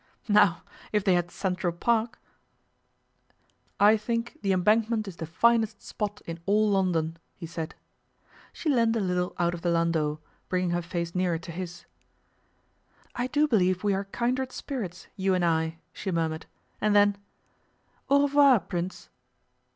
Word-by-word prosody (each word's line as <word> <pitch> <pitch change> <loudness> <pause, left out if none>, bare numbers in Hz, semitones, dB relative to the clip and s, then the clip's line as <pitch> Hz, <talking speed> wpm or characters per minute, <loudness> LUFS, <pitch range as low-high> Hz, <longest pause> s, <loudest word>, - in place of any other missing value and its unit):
Now, 205 -6 +4 0.3
if 210 -2 +1
they 190 - +3
had 175 -1 +1
Central 180 -1 -2
Park 225 +6 0 0.8
' - - -41
'I 210 +2 +6
think 230 +2 -3
the 200 -1 +1
Embankment 215 +4 +2
is 180 -3 -8
the 160 - -5
finest 220 +4 +2
spot 210 -1 -4
in 165 0 -6
all 210 +1 +3
London,' 170 -4 +1 0.2
he 170 - -8
said. 165 -1 -6 0.8
She - - -7
leaned 230 -5 +3
a - - +1
little 180 -2 -1
out 175 0 +1
of 170 - -6
the 175 - 0
landau, 165 -3 +1 0.3
bringing 180 -1 0
her 175 0 0
face 170 0 -4
nearer 180 -2 +1
to 170 +1 -9
his. 175 0 -7 1.3
'I 245 +1 -2
do 295 +4 +2
believe 185 -7 +2
we 205 -1 +2
are 195 +1 -2
kindred 250 +5 -1
spirits, 235 - -5
you 190 -1 +1
and 180 -1 +1
I,' 160 -1 0 0.2
she 195 - -5
murmured; 160 -1 -2 0.3
and 210 0 +2
then, 205 0 +5 0.9
'Au 280 +1 +5
revoir, 280 -4 +6
Prince! 180 0 -5
190 Hz, 155 wpm, -27 LUFS, 170-220 Hz, 1.3 s, I